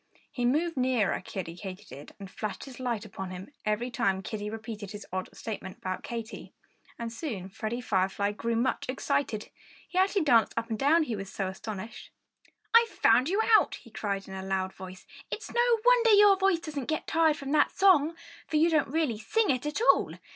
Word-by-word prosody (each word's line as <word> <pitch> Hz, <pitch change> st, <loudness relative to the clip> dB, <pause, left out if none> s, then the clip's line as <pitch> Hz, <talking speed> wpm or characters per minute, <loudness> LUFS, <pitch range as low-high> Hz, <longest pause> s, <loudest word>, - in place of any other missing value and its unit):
He 245 Hz, -, -2 dB
moved 310 Hz, +5 st, +1 dB
nearer 250 Hz, -5 st, +1 dB
Kiddie 170 Hz, -3 st, -6 dB
Katydid 185 Hz, -6 st, -9 dB
and 195 Hz, -, -9 dB
flashed 205 Hz, -3 st, -5 dB
his 265 Hz, -2 st, -10 dB
light 235 Hz, -4 st, -2 dB
upon 190 Hz, -2 st, -7 dB
him 185 Hz, +6 st, -8 dB, 0.2 s
every 225 Hz, +4 st, 0 dB
time 195 Hz, -6 st, 0 dB
Kiddie 210 Hz, -1 st, -4 dB
repeated 220 Hz, -2 st, -7 dB
his 210 Hz, +1 st, -8 dB
odd 185 Hz, 0 st, -3 dB
statement 195 Hz, -4 st, -7 dB
about 185 Hz, 0 st, -4 dB
Katy. 230 Hz, -1 st, -7 dB, 0.4 s
And 230 Hz, -1 st, -5 dB
soon 220 Hz, -, -5 dB
Freddie 220 Hz, +5 st, -4 dB
Firefly 200 Hz, -2 st, 0 dB
grew 230 Hz, +2 st, -2 dB
much 245 Hz, +2 st, -1 dB
excited. 255 Hz, -4 st, -1 dB, 0.4 s
He 365 Hz, -, -1 dB
actually 385 Hz, -1 st, +3 dB
danced 235 Hz, -7 st, +4 dB
up 230 Hz, 0 st, -2 dB
and 220 Hz, -, -2 dB
down, 315 Hz, +4 st, +4 dB
he 240 Hz, -7 st, -3 dB
was 195 Hz, -1 st, -7 dB
so 195 Hz, -, -2 dB
astonished. 215 Hz, +3 st, -7 dB, 0.6 s
"I've 465 Hz, 0 st, +7 dB
found 250 Hz, -, +3 dB
you 410 Hz, +4 st, +2 dB
out!" -, -, +3 dB
he 230 Hz, -, -15 dB
cried 200 Hz, -3 st, -3 dB
in 190 Hz, -, -9 dB
a 190 Hz, -, -5 dB
loud 190 Hz, 0 st, -2 dB
voice. 185 Hz, 0 st, -10 dB, 0.2 s
"It's 430 Hz, -, -6 dB
no 475 Hz, -1 st, +3 dB
wonder -, -, +5 dB
your 410 Hz, -1 st, +7 dB
voice 385 Hz, -2 st, +2 dB
doesn't 295 Hz, -5 st, -5 dB
get 310 Hz, -, -1 dB
tired 320 Hz, -2 st, +3 dB
from 275 Hz, -1 st, -6 dB
that 300 Hz, -1 st, +4 dB
song! 335 Hz, -5 st, +4 dB, 0.3 s
For 320 Hz, -, -4 dB
you 330 Hz, +2 st, +4 dB
don't 310 Hz, -3 st, +3 dB
really 285 Hz, -7 st, -1 dB
sing 435 Hz, -, +1 dB
it 255 Hz, +2 st, -1 dB
at 300 Hz, +8 st, -2 dB
all! -, -, -4 dB
235 Hz, 195 wpm, -29 LUFS, 200-310 Hz, 0.6 s, I've